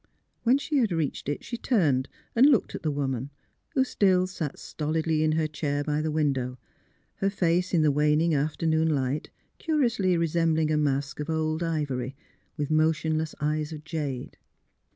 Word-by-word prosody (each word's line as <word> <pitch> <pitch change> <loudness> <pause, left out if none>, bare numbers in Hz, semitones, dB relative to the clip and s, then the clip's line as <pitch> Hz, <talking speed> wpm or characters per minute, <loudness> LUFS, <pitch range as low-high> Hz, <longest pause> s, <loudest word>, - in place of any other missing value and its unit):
When 245 +3 +4
she 290 +1 -1
had 230 -7 +2
reached 160 -4 -2
it, 145 - -3
she 235 - -5
turned 150 - +2 0.3
and 250 +4 +7
looked 270 -7 +3
at - - -5
the 155 - -1
woman, 135 -2 -2 0.5
who 265 - +4
still 190 -7 +3
sat 165 -6 -5
stolidly 155 0 -1
in 155 0 +2
her 160 0 +1
chair 145 -2 -2
by 150 +1 0
the 155 - -1
window, 135 -5 0 0.6
her 195 - +1
face, 180 -2 +1
in 165 -4 +3
the 150 - +4
waning 150 +3 +2
afternoon 160 +2 +1
light, 140 -1 -1 0.3
curiously 235 - +1
resembling 165 -1 +1
a - - +2
mask 140 -1 0
of 150 +2 -4
old 160 0 0
ivory, 140 -6 -2 0.4
with 150 0 -2
motionless 155 0 +1
eyes 150 +1 -1
of 155 -1 -7
jade. 150 -5 -4
155 Hz, 165 wpm, -27 LUFS, 145-170 Hz, 0.6 s, and